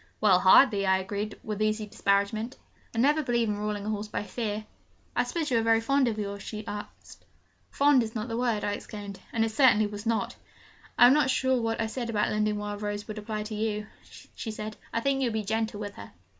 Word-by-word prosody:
'Well 195 -4 +5
hardly,' 200 +1 +6
I 190 0 +4
agreed, 205 +2 -4
with 215 -1 -4
easy 215 0 +1
disparagement. 205 +4 0 0.4
'I - - -4
never 295 +4 +4
believe 240 -5 +1
in 205 0 -2
ruling 210 -1 -3
a - - -2
horse 210 0 -3
by 210 - -3
fear.' 215 -1 -4 0.5
'I - - +3
suppose 320 -5 -2
you 235 - +4
are - - +1
very 225 0 +4
fond 275 +3 +2
of 220 -2 -1
yours?' 200 -1 -4
she 215 +1 -6
said. 205 0 -5 0.8
'Fond 285 -2 +4
is 225 0 -4
not 215 +1 -3
the 225 - -3
word!' 235 -3 0
I 205 - 0
exclaimed 205 -1 -7
and 225 -1 +1
it 225 - -3
certainly 220 -3 +5
was 205 +1 -6
not. 230 -1 -1 0.6
'I - - +9
am 250 - +8
not 295 -3 +3
sure 260 0 +2
that - - -1
what 225 0 -1
I 225 - +1
said 235 +1 -4
about 210 -2 +1
lending 210 0 +1
Wild 205 0 -5
Rose 205 0 -3
would 215 -1 -5
apply 215 0 -4
to 215 +1 -7
you,' 210 0 -2 0.5
she 225 - -5
said. 215 0 -5 0.2
'I 230 - -1
think 275 +1 +1
you 260 - +2
would 230 - -2
be 220 -1 -1
gentle 220 0 -1
with 205 -1 -5
her.' 100 - -11
215 Hz, 235 wpm, -28 LUFS, 205-230 Hz, 0.8 s, I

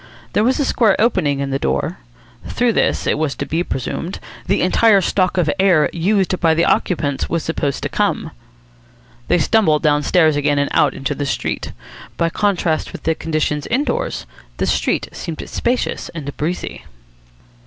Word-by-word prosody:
There 210 - +3
was 255 +5 +2
a 285 - +2
square 225 -7 +3
opening 145 - +1
in 140 0 -2
the 135 - -1
door. 65 - -1 0.5
Through 240 -1 +1
this, - - +1
it - - +1
was 155 -3 -1
to 140 - -4
be 165 +5 -1
presumed, 165 +5 -4 0.3
the - - +2
entire 200 +3 +4
stock 185 0 0
of 175 -3 +2
air 185 -6 +4
used 185 +1 +1
by 165 -2 +3
the 170 - +3
occupants 145 -6 0
was 165 -1 -1
supposed 145 -4 -2
to - - 0
come. - - -1 1.0
They - - +3
stumbled 165 -3 +2
downstairs 150 +1 +3
again 145 0 +1
and 140 0 0
out - - +3
into 135 +2 -2
the 145 0 -3
street. - - -3 0.5
By 165 0 +1
contrast 180 -6 0
with - - -9
the 160 - +2
conditions 155 -2 -2
indoors 265 +5 -1 0.3
the - - 0
street - - 0
seemed 165 -2 -6
spacious 245 +1 -2
and 145 -3 -6
breezy. 170 +4 -4
165 Hz, 165 wpm, -19 LUFS, 145-190 Hz, 1.0 s, entire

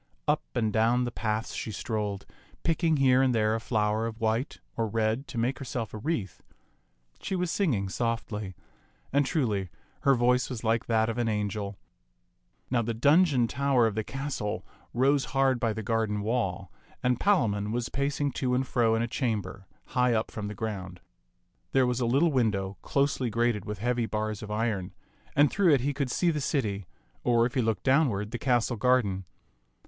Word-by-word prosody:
Up - - +3
and 110 -2 +1
down 115 +3 +3
the 120 - -2
paths 110 -1 -2
she 110 - -4
strolled, 105 -2 -3 0.4
picking 165 -1 +2
here 130 -1 +5
and 130 -2 +3
there 110 -1 +2
a 115 - 0
flower 110 -1 0
of 115 0 -7
white 115 +5 -1 0.2
or 115 -1 0
red 110 +5 0
to 125 - -7
make 125 +5 0
herself 125 -5 -4
a 110 - -5
wreath. 115 - -3 0.8
She 190 - -3
was 180 -2 -1
singing 125 - +1
softly; 105 -3 -3 0.6
and, 140 -1 +3
truly, 105 - 0 0.3
her 135 -1 +4
voice 125 +1 +2
was 120 -3 -5
like 115 0 +1
that 110 -1 +2
of 115 +1 -2
an 120 - +1
angel. 105 -1 -2 0.9
Now 120 -2 +3
the 115 0 -2
dungeon 145 0 +4
tower 135 -1 +2
of 110 - +1
the 110 +1 -2
castle 135 -5 -4 0.3
rose 135 +2 +2
hard 135 -2 +3
by 115 -1 +1
the 110 0 -4
garden 105 -1 0
wall, 100 -5 -2 0.3
and 125 -1 +2
Palamon 105 - +2
was 120 +1 -2
pacing 140 +1 -1
to 125 -1 +1
and 130 +1 +1
fro 115 -3 +2
in 115 - +1
a - - -1
chamber 105 -7 -3 0.2
high 125 -2 +2
up 110 - -1
from 105 -1 -5
the 105 - -6
ground. 95 -4 -5 0.7
There 130 -1 +4
was 125 0 0
a 120 - +1
little 145 +7 +3
window, 105 -7 0
closely 140 -3 0
grated 115 -2 0
with 105 0 -4
heavy 120 +2 0
bars 110 -1 -2
of 105 - -7
iron, 105 -4 -2 0.4
and 145 0 +5
through 195 -4 +4
it 130 - 0
he 145 +3 0
could 140 -2 -2
see 170 +7 +2
the 150 -2 -2
city, 105 - -1 0.4
or, 120 -1 +4
if 125 - -2
he 130 - +2
looked 110 -4 -1
downward, 130 -7 +2
the 120 - -4
castle 120 -2 +1
garden. 105 -6 +2
115 Hz, 185 wpm, -28 LUFS, 105-130 Hz, 0.9 s, here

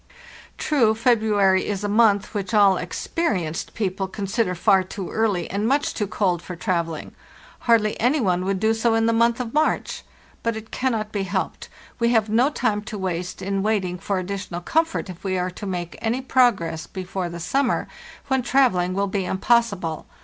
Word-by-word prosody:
True, 235 -8 +2
February 215 -5 +3
is 205 -1 -2
a - - 0
month 205 -1 +3
which 205 +1 -2
all 200 -2 +6
'experienced' 180 - -2
peo 205 -4 0
ple 190 +1 -3
consider 195 0 -1
far 195 +1 +4
too 185 0 -7
early 210 -6 0
and 205 +3 0
much 280 +3 +1
too 210 - -2
cold 185 -4 0
for 180 - -7
trav 170 -2 0
elling; 160 -2 -7 0.6
hardly 215 -2 +3
any 260 +6 +2
one 185 -6 +1
would 190 0 -1
do 220 +2 +2
so 225 0 +1
in 225 0 +2
the 230 - +2
month 235 +1 +3
of 235 -2 -4
March. 310 +1 0 0.4
But 230 -1 -1
it 220 0 -10
cannot 225 -5 -1
be 205 - -2
helped; 190 -2 -3 0.3
we 235 0 +3
have 220 -2 +2
no 240 +6 +3
time 210 -8 0
to 215 -1 -6
waste 180 -2 -4
in 195 0 -1
waiting 195 -4 0
for 200 +1 -2
additional 185 -1 -4
comfort 325 - 0
if 180 -2 -10
we 190 -1 -1
are 180 0 -1
to 205 +3 -7
make 175 -2 -4
any 230 +3 0
progress 205 -12 +2
before 185 -1 -4
the 170 0 -7
summer, 270 +10 0 0.4
when 265 -1 +1
travelling 230 -9 +2
will 200 +1 +1
be 195 -1 -2
impossible. 190 -5 0
205 Hz, 185 wpm, -23 LUFS, 185-230 Hz, 0.6 s, all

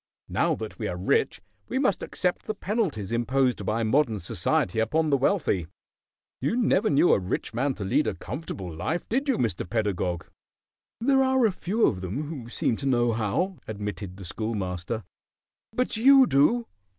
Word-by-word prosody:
Now - - +1
that - - -7
we - - -2
are - - -3
rich 445 0 +1 0.3
we - - -2
must 260 -8 +1
accept 180 -1 -2
the 215 - -2
penalties 185 - -2
imposed 125 0 +1
by 115 +2 +1
modern 115 -2 +2
society 90 +3 0
upon 155 +8 +1
the - - +5
wealthy. 135 - +1 0.7
You 145 - 0
never 225 -3 +2
knew 145 +5 +5
a - - +3
rich 95 +4 -3
man 135 +3 0
to 100 - -5
lead 150 +10 +2
a - - -1
comfortable 95 - -6
life, 160 - -2
did 270 +5 0
you, 265 - +3
Mr. 95 -7 -1
Pedagog?" 95 -5 -1 0.7
"There 270 +3 +3
are 260 -4 +3
few 200 +5 0
of 95 - 0
them 100 - -3
who 145 -6 -7
seem 120 -1 0
to 140 - -3
know 120 -2 +3
how," 115 - -1
admitted 105 -3 -5
the 100 - -9
Schoolmaster. 100 +1 -3 0.7
"But 250 +2 -1
you 270 +3 +7
do." 230 - +3
125 Hz, 170 wpm, -26 LUFS, -, 0.7 s, you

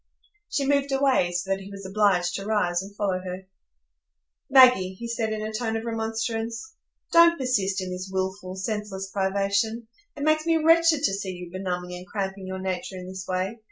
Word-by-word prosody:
She 280 - 0
moved 280 0 +1
away, 270 -10 +3
so 180 +2 -2
that 195 - +1
he 195 0 -10
was 195 -1 -9
obliged 190 -3 +2
to 195 - -4
rise 180 -5 +1
and 200 +1 -10
follow 195 -3 0
her. 185 +1 -7 1.0
"Maggie," 250 -9 +6
he 235 +5 -6
said, 230 -1 -2
in 215 0 -3
a 215 0 -4
tone 225 0 -1
of 225 - -5
remonstrance, 225 - -3 0.4
"don't 335 0 +7
persist 200 -7 0
in 185 - -5
this 185 +1 -5
wilful, 190 0 -3
senseless 195 -1 -4
privation. 200 +4 0 0.3
It 285 - -4
makes 310 +1 +2
me 330 -1 +4
wretched 325 -1 +4
to 195 - +2
see 195 -1 -3
you 180 -1 -9
benumbing 180 -1 -4
and 180 +1 -10
cramping 195 -1 -4
your 190 0 -4
nature 185 0 -4
in 180 0 -8
this 190 0 -7
way. 185 +5 -2
200 Hz, 190 wpm, -25 LUFS, 190-235 Hz, 1.0 s, don't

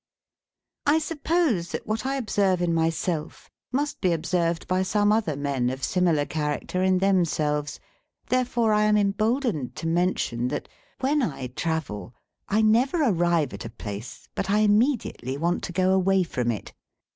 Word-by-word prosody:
I 295 +2 +5
suppose 310 - 0
that - - -4
what 220 +4 -2
I 270 - 0
observe 200 -7 +1
in 175 -1 +1
myself 165 0 -2 0.2
must 285 +3 -2
be 180 -3 +2
observed 170 0 -1
by 185 0 +1
some 205 +2 +2
other 210 -9 +1
men 135 -3 -1
of 130 +1 -5
similar 170 -5 +2
character 150 +4 -2
in 185 0 +3
themselves; 155 -6 +1 0.5
therefore 245 -3 +2
I 210 0 +3
am 210 0 +4
emboldened 210 - 0
to - - -6
mention, 165 -8 0
that, - - -4 0.3
when 285 +3 +2
I 150 - -2
travel, 130 - -3 0.3
I 215 +2 +3
never 255 +9 +3
arrive 170 - +1
at 100 - -7
a 115 - -6
place 105 0 -8
but 195 - -3
I 210 +2 +3
immediately 210 - +1
want 170 +4 0
to - - -6
go 185 +2 +2
away 190 0 +3
from 125 -8 -2
it. 110 -5 -4
180 Hz, 155 wpm, -25 LUFS, 150-215 Hz, 0.5 s, I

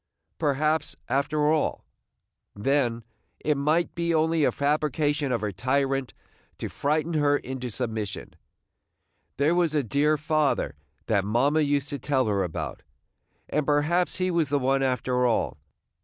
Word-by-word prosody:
Perhaps, 155 +1 0
after 150 +3 +1
all, 155 -2 0 0.7
then, 120 +1 0 0.4
it 150 - +1
might 155 +5 +1
be 170 -1 0
only 160 0 +2
a - - +4
fabrication 145 0 0
of 120 -4 0
her 105 -1 -1
tyrant 135 +6 -1 0.4
to - - -4
frighten 155 +3 -1
her 145 -2 +3
into 130 -2 -5
submission. 110 -3 -4 1.0
There 145 +4 +3
was 170 -3 +1
a 145 - +2
dear 145 +5 +2
Father 155 -1 0 0.3
that 100 -3 +1
mamma 130 +9 +2
used 145 -1 +1
to 140 - -4
tell 130 0 +1
her 100 -2 +1
about; 90 -4 -4 0.7
and 150 - 0
perhaps 150 +5 +1
he 185 0 0
was 165 -4 +1
the 145 - +2
one 135 0 +1
after 125 -1 +1
all. 115 - 0
145 Hz, 140 wpm, -26 LUFS, 130-155 Hz, 1.0 s, a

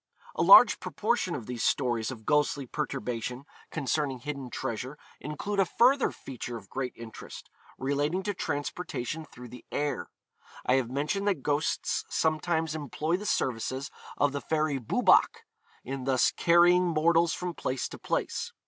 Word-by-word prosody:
A - - -2
large - - +8
proportion 215 -5 -1
of 125 -6 -6
these 125 -1 -4
stories 120 -5 +1
of 115 -5 -8
ghostly 145 -2 +1
perturbation 125 -2 -4 0.2
concerning 145 -2 -1
hidden 140 0 -6
treasure 130 +3 -4 0.2
include 195 +7 -4
a 195 - +5
further 260 +3 +4
feature 120 -2 -7
of 100 -4 -14
great 130 -2 -3
interest, 115 -1 -10 0.3
relating 145 +7 -1
to 205 - -1
transportation 145 -2 -4
through 125 -4 -12
the 125 - -11
air. 145 0 -2 0.6
I 125 - +3
have 125 -3 -1
mentioned 150 +10 -1
that 185 -10 0
ghosts 145 +1 0
sometimes 160 0 0
employ 155 +2 -2
the 210 +2 -6
services 130 +3 -1 0.3
of 145 -1 +2
the 140 0 -4
fairy 155 -3 0
Boobach 115 - +3 0.4
in 130 0 -5
thus 130 -2 +3
carrying 175 +1 +4
mortals 165 0 +3
from 180 -1 -4
place 130 -5 -2
to - - -10
place. - - -2
145 Hz, 150 wpm, -28 LUFS, 130-165 Hz, 0.6 s, large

